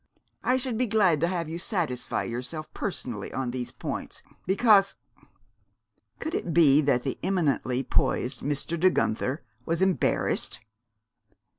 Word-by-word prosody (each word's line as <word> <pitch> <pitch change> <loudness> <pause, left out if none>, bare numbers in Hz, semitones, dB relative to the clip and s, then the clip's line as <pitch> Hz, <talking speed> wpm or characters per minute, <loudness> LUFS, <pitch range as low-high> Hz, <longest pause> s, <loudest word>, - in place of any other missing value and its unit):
I 255 - +3
should 250 -3 -2
be 250 - +2
glad 190 -8 +3
to 170 - +3
have 175 -3 -2
you 165 +2 -5
satisfy 170 - -2
yourself 125 +7 -5
personally 120 - -4
on 130 -2 -2
these 125 -1 -4
points, - - -6 0.2
because 200 0 +4 0.6
" - - -45
could 315 - -4
it 170 - -2
be 150 -3 +6
that 135 -4 +2
the 135 - -3
eminently 140 -8 0
poised 125 0 0
Mr. 145 +4 -2
De 185 +3 +6
Guenther 130 0 -1 0.2
was 165 +5 -1
embarrassed? 190 -11 +1
165 Hz, 140 wpm, -27 LUFS, 130-190 Hz, 0.6 s, be